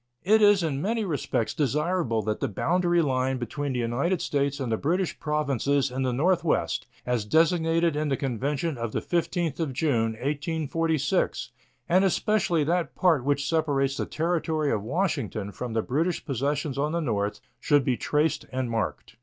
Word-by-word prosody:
It 215 +4 +4
is 205 -3 +5
in 145 -4 -1
many 220 +4 0
respects 145 - -1
desirable 150 -4 0
that 105 +1 -2
the - - 0
boundary 175 - +1
line 130 -2 0
between 140 +3 -3
the - - -2
United 140 +10 0
States 140 -1 -1
and 130 -4 -2
the - - +3
British 170 - -1
Provinces 140 -3 0
in 130 +1 -3
the 130 -1 +1
northwest, 170 +9 +1 0.2
as 125 -3 0
designated 165 +5 +2
in 150 0 -1
the 135 - 0
convention 140 +3 -2
of 115 -2 -3
the - - 0
15th 170 -3 -1
of 155 -5 -1
June, 120 -6 +1
1846, 150 +3 -1 0.4
and 180 +3 +4
especially 190 -4 +2
that 170 +3 -1
part 165 -8 +3
which 140 0 0
separates 140 -4 +1
the - - -2
Territory 160 -2 0
of 105 - 0
Washington 110 - -2
from 120 +2 -5
the 110 -1 0
British 165 +7 -1
possessions 140 +1 -1
on 150 +2 0
the 170 - +1
north, 105 -9 -1 0.2
should 145 -2 +3
be 130 - +2
traced 150 +5 0
and 130 -2 -2
marked. 110 -3 -3
145 Hz, 170 wpm, -26 LUFS, 130-165 Hz, 0.4 s, is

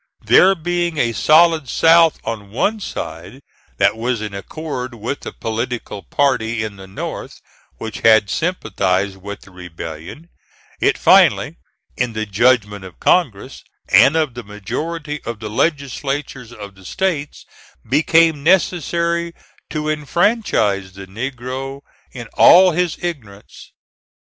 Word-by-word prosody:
There 190 +1 +6
being 175 -1 -2
a 120 -4 +1
solid 155 0 +4
South 165 0 +4
on 105 -3 -5
one 205 - -1
side 85 - -7 0.4
that - - +3
was 120 +1 -2
in 105 -1 -6
accord 125 +3 -6
with 115 +5 -4
the - - -7
political 115 -2 -4
party 115 -1 0
in 105 -2 -6
the 95 0 -11
North 95 - -7 0.4
which 110 -2 -6
had 110 -2 +5
sympathized 100 - -1
with 100 +1 -8
the 95 - -17
rebellion, 90 - -9 0.5
it - - +2
finally, - - +4 0.4
in 120 -2 -2
the 110 0 -3
judgment 105 -1 +1
of 95 -3 -12
Congress - - 0 0.3
and 140 - +6
of 155 -5 0
the 120 - -7
majority 150 - -5
of 115 -2 -6
the 110 -1 -6
legislatures 140 -2 -2
of 100 -4 -10
the 95 0 -18
States, 150 - -3 0.4
became 160 +3 +3
necessary 170 0 +1 0.3
to 155 -1 -3
enfranchise 150 - 0
the 95 0 -10
negro, 130 +5 -6 0.3
in 120 -2 -8
all 185 +1 +7
his 175 -1 -1
ignorance. 110 - -7
125 Hz, 130 wpm, -19 LUFS, 105-160 Hz, 0.5 s, all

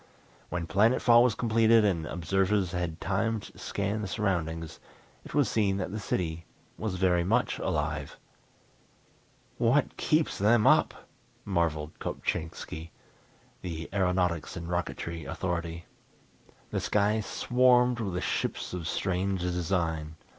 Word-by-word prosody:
When 90 -1 -2
planet 110 +8 +3
fall 120 0 +6
was 125 -3 +2
completed 115 -1 +4
and 85 -6 0
observers 95 +2 0
had 85 -3 -3
time 110 +3 0
to - - -13
scan 100 +2 -2
the 105 - -3
surroundings 85 -6 -2 0.4
it - - -9
was 145 -3 +4
seen 100 -3 +1
that 95 -2 -3
the 105 - -4
city 85 -4 -2 0.3
was 105 -4 -3
very 90 -2 +2
much 115 +7 +1
alive. 75 -1 -2 1.4
"What 125 +4 +2
keeps 155 0 +1
them 105 +2 +4
up!" - - +3 0.4
marvelled 80 -5 -1
Kopchainski, 80 0 -4 0.7
the 85 -2 -5
aeronautics 90 -4 0
and 85 0 -6
rocketry 85 -1 -3
authority. 85 -2 -3 0.9
The - - 0
sky 105 +1 +1
swarmed 125 +2 +3
with 95 -5 -2
ships - - -2
of 85 -3 -4
strange 95 +1 -1
design. 85 -3 -1
95 Hz, 125 wpm, -29 LUFS, 85-110 Hz, 1.4 s, fall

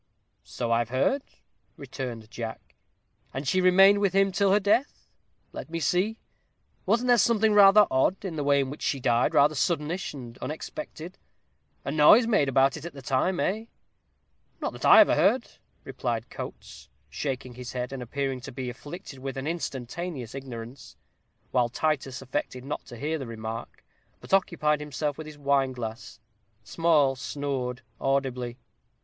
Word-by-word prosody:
"So 120 -1 -4
I've 115 0 +1
heard," 135 - +1 0.6
returned 115 -5 -7
Jack; 115 -2 -7 0.6
"and 135 +1 -4
she 185 +7 +2
remained 195 +2 +6
with 200 -2 +1
him 195 0 +3
till 200 0 +2
her 205 - +5
death. 210 +7 0 0.4
Let - - -8
me 165 0 -3
see, 190 +7 +1 0.7
wasn't 235 +5 +2
there 240 -1 +6
something 220 0 +3
rather 205 0 +8
odd 180 +10 +1
in 175 -4 -4
the 150 - -2
way 140 0 +3
in 135 -1 -3
which 145 - -9
she 140 - -1
died, 120 -1 +2
rather 145 +2 +5
suddenish 165 +4 -1
and 120 -3 -10
unexpected, 165 - -7 0.7
a - - -2
noise 155 - +7
made 195 -12 +2
about 135 +2 +3
it 150 - -10
at 170 - -7
the 135 -2 -11
time, 140 +9 0
eh?" 215 +4 -1 0.9
"Not - - -3
that - - -6
I - - +10
ever - - +5
heard," 255 -1 +3 0.4
replied - - -4
Coates, - - -9 0.2
shaking 130 -3 -4
his 125 0 -8
head, 125 +1 -4
and 135 - -5
appearing 135 +1 -3
to - - -8
be 125 -1 -5
afflicted 135 +2 -10
with 135 +1 -5
an 135 - -4
instantaneous 145 -3 -4
ignorance; 120 -3 -8 0.6
while 120 -1 +2
Titus 135 -1 -2
affected 130 0 -4
not 145 - -4
to 120 - -10
hear 155 +5 -2
the 135 - -6
remark, 115 0 -7 0.3
but - - -9
occupied 160 -6 +2
himself 150 0 -3
with 155 - -7
his 155 -1 -10
wine 140 -2 +1
glass. 115 -1 -7 0.4
Small 150 +1 +2
snored 130 -2 -4 0.2
audibly. 130 -3 -1
140 Hz, 160 wpm, -27 LUFS, 125-175 Hz, 0.9 s, I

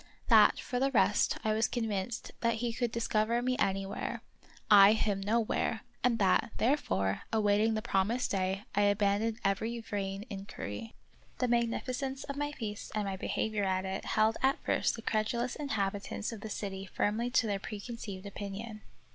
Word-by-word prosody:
That, - - +7
for 250 - -3
the 270 +1 +2
rest, 215 -4 +3
I 215 - +2
was 220 +1 +2
con 240 - -2
vinced 220 +2 -3
that 230 -1 +1
he 235 +1 -2
could 240 -1 -1
discover 230 0 +1
me 255 0 +1
anywhere; 195 0 -1 0.4
I 205 0 +8
him 205 -3 0
nowhere; 225 +1 0 0.2
and 240 -1 +3
that, 195 +1 +3
therefore, 100 - +1
awaiting 215 0 +3
the 215 - -2
promised 215 +6 +1
day, 190 0 -1
I 205 - +2
abandoned 205 +2 +2
every 220 +4 0
vain 200 -2 -4
inquiry. 200 - -7 0.4
The 250 - +1
magnificence 255 +3 -1
of 280 - -5
my 290 +1 -2
feast 215 -7 -6
and 210 -1 0
my 195 -1 -2
behavior 210 +2 -1
at 190 0 0
it 190 0 -4
held 220 +1 +2
at 265 +1 +3
first - - +1
the 225 - -9
credulous 235 +3 0
inhabitants 205 -6 -2
of 225 -3 -8
the 220 - -6
city 195 -2 -5
firmly 220 +6 0
to 245 -1 +3
their 200 -2 -1
preconceived 205 -2 -7
opinion. 205 +2 -6
215 Hz, 165 wpm, -31 LUFS, 200-235 Hz, 0.4 s, I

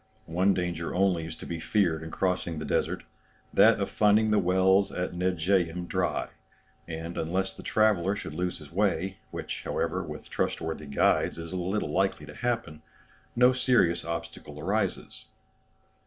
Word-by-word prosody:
One 90 +4 +2
danger 85 -2 -2
only 90 -4 +2
is 80 - -7
to - - -10
be 85 -1 -4
feared 85 -4 +1
in 80 - -7
crossing 90 -2 -1
the 75 - -4
desert; - - -1 0.5
that 115 0 +6
of 100 - 0
finding 105 +1 +4
the 105 - +4
wells 95 +2 +3
at 90 0 -3
Nedjeym 90 -1 0
dry; - - -1 0.6
and, 85 +1 -5
unless 95 +4 -1
the - - -10
traveller 100 -3 +2
should 90 - -6
lose 90 +2 -2
his 75 -2 -13
way, 95 0 0
which, - - -5
however, - - -1
with - - -8
trustworthy 80 -2 -2
guides, 70 - +2
is 85 +1 -7
little 90 -2 -1
likely 95 +4 0
to - - -10
happen, 115 -11 -2 0.5
no 125 +1 +6
serious 125 -10 +3
obstacle 85 -3 -6
arises. 100 +4 -2
90 Hz, 155 wpm, -28 LUFS, 85-100 Hz, 0.6 s, that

